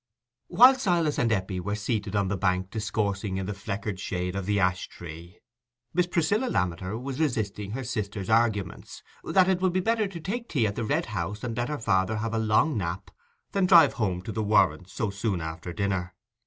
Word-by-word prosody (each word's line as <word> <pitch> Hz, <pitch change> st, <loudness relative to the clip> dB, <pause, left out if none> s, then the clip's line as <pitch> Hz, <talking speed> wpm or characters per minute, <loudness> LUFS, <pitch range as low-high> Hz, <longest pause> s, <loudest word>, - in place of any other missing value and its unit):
While 255 Hz, +3 st, +8 dB
Silas 170 Hz, -, +1 dB
and 115 Hz, -1 st, +2 dB
Eppie 95 Hz, -2 st, -1 dB
were 100 Hz, +3 st, -2 dB
seated 105 Hz, -1 st, -2 dB
on 100 Hz, -1 st, +2 dB
the 100 Hz, -, -1 dB
bank 95 Hz, 0 st, 0 dB
discoursing 105 Hz, -2 st, -2 dB
in 95 Hz, -, -3 dB
the 105 Hz, -, -3 dB
fleckered 100 Hz, 0 st, -4 dB
shade 90 Hz, -2 st, -3 dB
of 100 Hz, -1 st, -3 dB
the 100 Hz, -1 st, +2 dB
ash 90 Hz, -1 st, +1 dB
tree, 85 Hz, +3 st, -10 dB, 0.6 s
Miss 180 Hz, 0 st, +2 dB
Priscilla 180 Hz, +8 st, +1 dB
Lammeter 95 Hz, -, -1 dB
was 135 Hz, +2 st, -5 dB
resisting 105 Hz, -8 st, -1 dB
her 135 Hz, +2 st, -3 dB
sister's 105 Hz, -5 st, -4 dB
arguments, 110 Hz, -5 st, 0 dB, 0.2 s
that 185 Hz, -2 st, +3 dB
it 185 Hz, -1 st, +1 dB
would 185 Hz, -2 st, +2 dB
be 185 Hz, -, +2 dB
better 220 Hz, +2 st, +1 dB
to 185 Hz, -3 st, -8 dB
take 230 Hz, +8 st, -4 dB
tea 125 Hz, -7 st, +1 dB
at 105 Hz, -1 st, -1 dB
the 115 Hz, -, -2 dB
Red 110 Hz, -, 0 dB
House, 95 Hz, +3 st, -3 dB
and 120 Hz, -2 st, -3 dB
let 120 Hz, +2 st, -1 dB
her 150 Hz, -, -2 dB
father 95 Hz, -2 st, +1 dB
have 115 Hz, +1 st, -3 dB
a 115 Hz, -, +1 dB
long 110 Hz, +7 st, +2 dB
nap, 85 Hz, -2 st, -3 dB, 0.4 s
than 195 Hz, -2 st, +2 dB
drive 170 Hz, -6 st, +7 dB
home 95 Hz, -5 st, -1 dB
to 110 Hz, -, -5 dB
the 110 Hz, -, -2 dB
Warrens 95 Hz, -4 st, +2 dB
so 100 Hz, +2 st, -2 dB
soon 100 Hz, -1 st, -1 dB
after 80 Hz, +2 st, -6 dB
dinner. 95 Hz, 0 st, -2 dB
105 Hz, 205 wpm, -27 LUFS, 95-135 Hz, 0.6 s, While